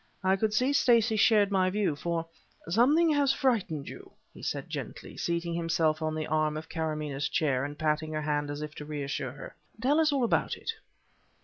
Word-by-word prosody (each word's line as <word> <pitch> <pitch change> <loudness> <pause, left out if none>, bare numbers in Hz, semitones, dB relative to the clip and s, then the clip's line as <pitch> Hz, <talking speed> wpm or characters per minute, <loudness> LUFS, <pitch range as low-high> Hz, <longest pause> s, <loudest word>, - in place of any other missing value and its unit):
I 190 0 +4
could 215 +2 0
see 250 +5 +2
that - - +1
Stacey 230 -2 +4
shared 210 -2 +4
my 185 -2 +3
view, 195 -5 0
for: 165 +2 -2 0.4
"Something 285 - +4
has 285 -2 +3
frightened 210 - 0
you," - - -10 0.2
he - - -13
said - - -3
gently, - - -7
seating 170 0 -2
himself 165 -2 +1
on 155 0 -1
the 155 0 -2
arm 155 0 0
of 160 +1 -8
Karamaneh's 150 -3 -2
chair 140 -6 +1
and 145 +1 -5
patting 155 0 0
her 155 0 -2
hand 145 -1 -1
as 145 +1 -4
if 150 0 -6
to - - -6
reassure 140 -3 -4
her. 140 - -10 0.2
"Tell 275 +6 +2
us 315 -2 +3
all 275 -3 +1
about 235 - +1
it." - - -3
165 Hz, 200 wpm, -29 LUFS, 150-220 Hz, 0.4 s, I